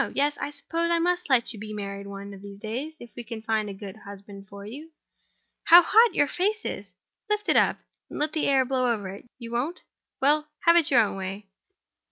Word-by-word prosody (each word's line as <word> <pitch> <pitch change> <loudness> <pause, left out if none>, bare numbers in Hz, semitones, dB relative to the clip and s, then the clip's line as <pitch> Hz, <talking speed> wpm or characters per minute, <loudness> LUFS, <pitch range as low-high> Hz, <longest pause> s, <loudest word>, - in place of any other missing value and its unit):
Yes; 290 +1 +2
I 285 - -3
suppose 330 +4 -3
I 340 - +3
must 355 0 0
let 245 -3 +3
you 215 - -10
be 215 0 -7
married 200 -1 -6
one 200 0 -8
of 195 - -11
these 200 0 -10
days—if 240 +4 -6
we 240 - -6
can 225 -1 -8
find 220 -2 0
a - - -5
good 195 +1 -9
husband 200 -1 -11
for 200 +1 -10
you. 285 +9 -9 0.8
How 345 +1 +9
hot 445 +3 +5
your 290 - +4
face 420 +8 -1
is! - - -6 0.3
Lift 420 0 -1
it - - +3
up, - - +4 0.3
and - - -7
let 300 +1 0
the 315 - 0
air 270 -2 +4
blow 255 -1 +1
over 205 -4 -3
it. 195 +4 -10
You 235 -2 -9
won't? 275 +10 -2 0.4
Well—have 305 +3 +3
your 250 -4 +6
own 205 -3 -1
way. 195 +1 -6
245 Hz, 210 wpm, -26 LUFS, 205-310 Hz, 0.8 s, How